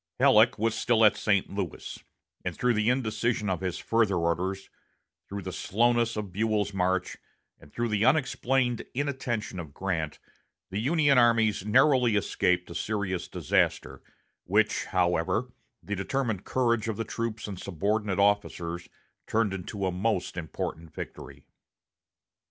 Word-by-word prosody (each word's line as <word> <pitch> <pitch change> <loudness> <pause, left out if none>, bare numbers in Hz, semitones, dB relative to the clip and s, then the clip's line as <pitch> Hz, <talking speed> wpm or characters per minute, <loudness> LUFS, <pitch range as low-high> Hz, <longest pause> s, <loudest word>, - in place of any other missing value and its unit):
Halleck - - +5
was 115 +1 +1
still 115 0 +3
at 105 - +5
St. 100 -3 +1
Louis; 100 -4 -5 0.4
and - - -4
through 125 -1 +2
the 105 +1 +1
indecision 115 -4 0
of 90 -1 -2
his 90 -2 -2
further 115 -4 +1
orders, 90 +3 -1 0.6
through 100 0 -5
the 95 - -5
slowness 115 +5 +1
of 105 -3 -4
Buell's 105 0 0
march, 95 -1 0 0.4
and 70 - -17
through 120 0 -2
the 105 -1 +1
unexplained 130 -2 +2
inattention 130 -8 -2
of 75 -4 -8
Grant, 85 -6 -2 0.5
the 100 - -2
Union 145 +1 +3
armies 115 -4 +3
narrowly 125 -1 +4
escaped 90 -3 +1
a - - -5
serious 100 -4 -2
disaster, 65 +1 0 0.4
which, - - +1
however, 90 +7 0 0.3
the 105 - -3
determined 110 0 -2
courage 115 -3 +1
of 110 - -2
the 115 - -1
troops 115 -1 -4
and 100 -3 -6
subordinate 100 +2 -1
officers 90 -4 0 0.4
turned 110 -3 +1
into 95 +1 -4
a 95 - 0
most 95 0 -1
important 80 -1 -5
victory. - - -8
105 Hz, 140 wpm, -28 LUFS, 95-115 Hz, 0.6 s, Halleck